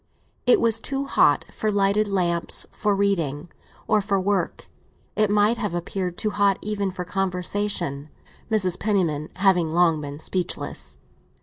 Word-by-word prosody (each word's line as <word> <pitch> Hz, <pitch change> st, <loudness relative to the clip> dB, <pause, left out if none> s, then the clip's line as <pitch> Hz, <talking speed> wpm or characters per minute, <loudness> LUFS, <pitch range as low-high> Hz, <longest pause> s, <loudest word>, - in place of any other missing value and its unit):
It 250 Hz, -, +6 dB
was 225 Hz, -1 st, +2 dB
too 275 Hz, +3 st, -2 dB
hot -, -, +3 dB
for 215 Hz, -, -1 dB
lighted 200 Hz, +1 st, +2 dB
lamps, 175 Hz, -4 st, -1 dB
for 205 Hz, -1 st, 0 dB
reading, 170 Hz, -6 st, 0 dB, 0.4 s
or 215 Hz, -1 st, +3 dB
for 195 Hz, 0 st, 0 dB
work; 190 Hz, -2 st, -1 dB, 0.5 s
it 215 Hz, -1 st, +2 dB
might 210 Hz, +3 st, +3 dB
have 210 Hz, -7 st, -2 dB
appeared 180 Hz, +1 st, -3 dB
too 215 Hz, -, 0 dB
hot 200 Hz, -1 st, +2 dB
even 205 Hz, -2 st, -1 dB
for 180 Hz, -1 st, -5 dB
conversation, 180 Hz, -5 st, -2 dB, 0.4 s
Mrs. 195 Hz, -5 st, +1 dB
Penniman 170 Hz, -8 st, 0 dB
having 185 Hz, -4 st, +3 dB
long 165 Hz, -1 st, +3 dB
been 145 Hz, -1 st, -6 dB
speechless. 180 Hz, +3 st, -4 dB
195 Hz, 140 wpm, -24 LUFS, 175-205 Hz, 0.5 s, It